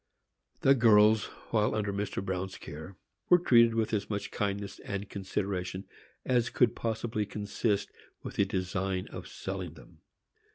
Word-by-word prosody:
The 135 Hz, -, +6 dB
girls, 110 Hz, -3 st, +6 dB, 0.3 s
while 110 Hz, -1 st, +2 dB
under 105 Hz, -2 st, -1 dB
Mr. 100 Hz, -1 st, -3 dB
Bruin's 95 Hz, 0 st, -3 dB
care, 80 Hz, +6 st, -9 dB, 0.3 s
were 180 Hz, -, +8 dB
treated 115 Hz, -8 st, +5 dB
with 115 Hz, -1 st, 0 dB
as 100 Hz, -2 st, -1 dB
much 100 Hz, -1 st, -3 dB
kindness 100 Hz, -1 st, -3 dB
and 100 Hz, 0 st, -5 dB
consideration 95 Hz, -1 st, -3 dB, 0.4 s
as 120 Hz, -2 st, +2 dB
could 125 Hz, -3 st, +3 dB
possibly 110 Hz, -1 st, -2 dB
consist 100 Hz, 0 st, -1 dB, 0.3 s
with -, -, -7 dB
the 100 Hz, -, +4 dB
design 95 Hz, 0 st, -2 dB
of -, -, -8 dB
selling -, -, -5 dB
them. -, -, -16 dB
100 Hz, 140 wpm, -30 LUFS, 95-110 Hz, 0.4 s, were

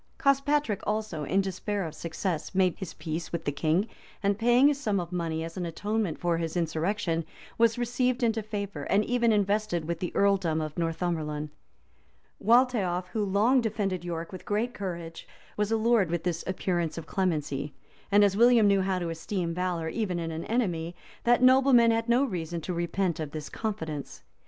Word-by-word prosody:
[] -, -, -40 dB
Cospatric 275 Hz, -5 st, +2 dB
also, 210 Hz, -8 st, -2 dB
in 195 Hz, +7 st, +2 dB
despair 195 Hz, +1 st, -3 dB
of 160 Hz, -, -6 dB
success, 170 Hz, +2 st, -4 dB
made 185 Hz, -2 st, +3 dB
his 190 Hz, -4 st, -6 dB
peace 160 Hz, 0 st, -5 dB
with 170 Hz, -, -4 dB
the 145 Hz, -, +1 dB
king, 160 Hz, +8 st, +1 dB, 0.4 s
and 200 Hz, +1 st, +1 dB
paying 245 Hz, +5 st, +5 dB
a -, -, +2 dB
sum 220 Hz, -8 st, -1 dB
of 175 Hz, 0 st, -5 dB
money 165 Hz, -2 st, -2 dB
as 165 Hz, +2 st, -7 dB
an 180 Hz, -, -2 dB
atonement 205 Hz, 0 st, -2 dB
for 170 Hz, -1 st, 0 dB
his 165 Hz, +1 st, -3 dB
insurrection, 165 Hz, +1 st, -1 dB, 0.4 s
was 230 Hz, 0 st, +4 dB
received 245 Hz, +1 st, 0 dB
into 225 Hz, -1 st, +2 dB
favor, 200 Hz, -6 st, -5 dB
and 205 Hz, +1 st, +2 dB
even 235 Hz, -1 st, +2 dB
invested 205 Hz, -4 st, +1 dB
with 170 Hz, 0 st, -3 dB
the 180 Hz, -, -3 dB
earldom 190 Hz, -5 st, +2 dB
of 155 Hz, -1 st, -4 dB
Northumberland. 160 Hz, -3 st, -2 dB, 0.9 s
Waltheof, 215 Hz, -7 st, +3 dB
who 215 Hz, +1 st, -1 dB
long 210 Hz, +7 st, +3 dB
defended 200 Hz, -5 st, -2 dB
York 170 Hz, -1 st, -4 dB
with 185 Hz, -, -8 dB
great 225 Hz, +4 st, -1 dB
courage, 170 Hz, -4 st, -6 dB, 0.3 s
was 210 Hz, +1 st, -1 dB
allured 225 Hz, -4 st, +3 dB
with 170 Hz, -1 st, -2 dB
this 170 Hz, -2 st, -2 dB
appearance 175 Hz, -3 st, -1 dB
of 165 Hz, -, -5 dB
clemency; 150 Hz, -6 st, -2 dB, 0.4 s
and 205 Hz, +1 st, +6 dB
as 200 Hz, -1 st, +3 dB
William 235 Hz, 0 st, +6 dB
knew 200 Hz, -1 st, +4 dB
how 190 Hz, 0 st, 0 dB
to 175 Hz, -2 st, -2 dB
esteem 170 Hz, +1 st, -3 dB
valor, 175 Hz, -2 st, -2 dB
even 185 Hz, 0 st, -2 dB
in 165 Hz, -1 st, -3 dB
an 160 Hz, +1 st, -5 dB
enemy, 175 Hz, -8 st, -1 dB, 0.3 s
that 240 Hz, +1 st, +4 dB
nobleman 255 Hz, -2 st, +6 dB
had 225 Hz, +1 st, 0 dB
no 245 Hz, +3 st, +4 dB
reason 170 Hz, -, -3 dB
to 180 Hz, +3 st, -4 dB
repent 170 Hz, 0 st, -1 dB
of 155 Hz, -2 st, -3 dB
this 150 Hz, 0 st, -6 dB
confidence. 160 Hz, -10 st, -5 dB
185 Hz, 180 wpm, -28 LUFS, 165-220 Hz, 0.9 s, and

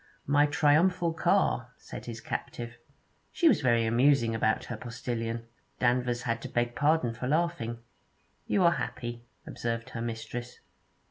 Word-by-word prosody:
'My 145 Hz, +1 st, +4 dB
triumphal 165 Hz, +3 st, +3 dB
car,' -, -, +2 dB
said -, -, -9 dB
his 115 Hz, -1 st, -6 dB
captive. 120 Hz, 0 st, -5 dB, 0.6 s
She 340 Hz, -, +3 dB
was 310 Hz, -, +5 dB
very 120 Hz, -4 st, +3 dB
amusing 120 Hz, 0 st, +3 dB
about 110 Hz, -1 st, +1 dB
her 120 Hz, -, -5 dB
postillion; 115 Hz, 0 st, -4 dB, 0.3 s
Danvers 125 Hz, -1 st, +1 dB
had 115 Hz, -1 st, -1 dB
to -, -, -6 dB
beg 120 Hz, 0 st, 0 dB
pardon 145 Hz, -2 st, +2 dB
for 120 Hz, +2 st, -4 dB
laughing. 155 Hz, -6 st, 0 dB, 0.7 s
'You 195 Hz, -, +2 dB
are 170 Hz, -, +6 dB
happy,' 120 Hz, -7 st, -4 dB, 0.2 s
observed 115 Hz, 0 st, -4 dB
her 115 Hz, -, -5 dB
mistress. 120 Hz, +1 st, -5 dB
120 Hz, 140 wpm, -29 LUFS, 115-145 Hz, 0.7 s, are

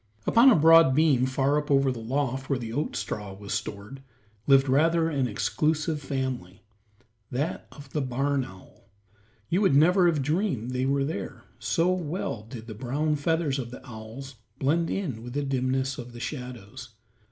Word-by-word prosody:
Upon 240 Hz, +4 st, +6 dB
a 255 Hz, -, +6 dB
broad 165 Hz, -3 st, +6 dB
beam 140 Hz, -5 st, +3 dB
far 135 Hz, +2 st, +1 dB
up 150 Hz, +1 st, -7 dB
over 135 Hz, -1 st, +3 dB
the 125 Hz, -, -5 dB
loft 135 Hz, +2 st, -2 dB
where 140 Hz, -, +1 dB
the 115 Hz, -2 st, -6 dB
oat 145 Hz, +5 st, -2 dB
straw 105 Hz, -2 st, -4 dB
was 100 Hz, +1 st, -6 dB
stored, 105 Hz, +7 st, -5 dB, 0.5 s
lived 135 Hz, 0 st, +5 dB
rather 165 Hz, +5 st, +3 dB
an 135 Hz, -4 st, 0 dB
exclusive 150 Hz, +7 st, -1 dB
family, 130 Hz, -9 st, -4 dB, 0.7 s
that 140 Hz, +6 st, -3 dB
of 145 Hz, -2 st, -13 dB
the 150 Hz, -, 0 dB
barn 135 Hz, +2 st, 0 dB
owl. 95 Hz, 0 st, -15 dB, 0.6 s
You 180 Hz, -, +1 dB
would 190 Hz, -9 st, +4 dB
never 175 Hz, +5 st, +5 dB
have 155 Hz, -5 st, +1 dB
dreamed 150 Hz, -, -1 dB
they 130 Hz, +1 st, -1 dB
were 140 Hz, 0 st, +1 dB
there, 160 Hz, -, -5 dB, 0.2 s
so 165 Hz, +11 st, +1 dB
well 170 Hz, -, -3 dB
did 115 Hz, -3 st, -8 dB
the 115 Hz, -, -7 dB
brown 140 Hz, +7 st, -1 dB
feathers 150 Hz, -1 st, 0 dB
of 120 Hz, -3 st, -5 dB
the 125 Hz, -, -11 dB
owls 120 Hz, +3 st, -9 dB, 0.2 s
blend 165 Hz, +5 st, +1 dB
in 145 Hz, -, -3 dB
with 120 Hz, +1 st, -8 dB
the 145 Hz, +1 st, -1 dB
dimness 130 Hz, -1 st, -1 dB
of 120 Hz, 0 st, -8 dB
the 120 Hz, -, -9 dB
shadows. 125 Hz, -1 st, -7 dB
135 Hz, 175 wpm, -27 LUFS, 125-150 Hz, 0.7 s, Upon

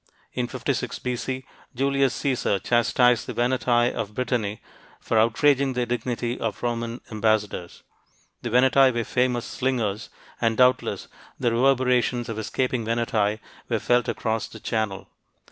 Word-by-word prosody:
In 125 Hz, -1 st, -1 dB
56 -, -, -3 dB
B.C., 125 Hz, +1 st, -4 dB, 0.3 s
Julius 135 Hz, 0 st, +1 dB
Caesar 130 Hz, -7 st, 0 dB
chastised 120 Hz, +3 st, +2 dB
the -, -, -5 dB
Veneti 120 Hz, -1 st, +2 dB
of 105 Hz, 0 st, -4 dB
Brittany 115 Hz, -5 st, -1 dB, 0.4 s
for 115 Hz, -, +1 dB
outraging 135 Hz, +4 st, +3 dB
the 125 Hz, -1 st, 0 dB
dignity 120 Hz, 0 st, -2 dB
of 115 Hz, -1 st, -3 dB
Roman 115 Hz, 0 st, -2 dB
ambassadors. 105 Hz, -5 st, -1 dB, 0.6 s
The 120 Hz, -, -3 dB
Veneti 130 Hz, +2 st, +5 dB
were 120 Hz, -1 st, -1 dB
famous 125 Hz, 0 st, 0 dB
slingers, 115 Hz, -5 st, -2 dB, 0.3 s
and 115 Hz, -1 st, +1 dB
doubtless 125 Hz, 0 st, +2 dB, 0.3 s
the 120 Hz, -, +1 dB
reverberations 125 Hz, -1 st, +2 dB
of 110 Hz, -1 st, -4 dB
escaping 125 Hz, +2 st, -1 dB
Veneti 110 Hz, -2 st, 0 dB, 0.3 s
were -, -, +1 dB
felt 120 Hz, -1 st, +2 dB
across 110 Hz, 0 st, -2 dB
the 110 Hz, -, -11 dB
Channel. 110 Hz, -3 st, -2 dB
120 Hz, 130 wpm, -24 LUFS, 110-125 Hz, 0.6 s, Veneti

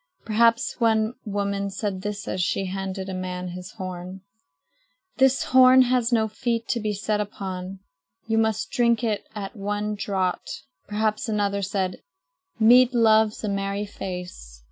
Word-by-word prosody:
Perhaps 230 Hz, +3 st, +2 dB
one 220 Hz, -1 st, +2 dB
woman 200 Hz, -1 st, -2 dB
said 195 Hz, -1 st, -4 dB
as 200 Hz, -3 st, -3 dB
she 195 Hz, +2 st, 0 dB
handed 190 Hz, 0 st, -4 dB
a 190 Hz, -, -4 dB
man 180 Hz, 0 st, -4 dB
his 180 Hz, +1 st, -8 dB
horn: 185 Hz, -1 st, -7 dB, 1.0 s
"This 265 Hz, 0 st, +4 dB
horn 255 Hz, 0 st, +7 dB
has 250 Hz, -1 st, +1 dB
no 220 Hz, -2 st, +3 dB
feet 230 Hz, +1 st, -2 dB
to 235 Hz, -, +1 dB
be 215 Hz, -1 st, -1 dB
set 210 Hz, +1 st, -1 dB
down -, -, -1 dB
upon. 190 Hz, -1 st, -6 dB, 0.5 s
You 225 Hz, 0 st, +1 dB
must 220 Hz, -1 st, 0 dB
drink 235 Hz, -1 st, +2 dB
it 215 Hz, -3 st, -1 dB
at 200 Hz, 0 st, -6 dB
one 205 Hz, +1 st, -2 dB
draught." 190 Hz, -8 st, -2 dB, 0.2 s
Perhaps 215 Hz, +2 st, -1 dB
another 200 Hz, -2 st, 0 dB
said: 190 Hz, -1 st, -2 dB, 0.6 s
"Mead 245 Hz, +3 st, +6 dB
loves 220 Hz, -2 st, +3 dB
a -, -, -1 dB
merry 200 Hz, 0 st, -2 dB
face." 180 Hz, -, -8 dB
205 Hz, 145 wpm, -24 LUFS, 190-225 Hz, 1.0 s, horn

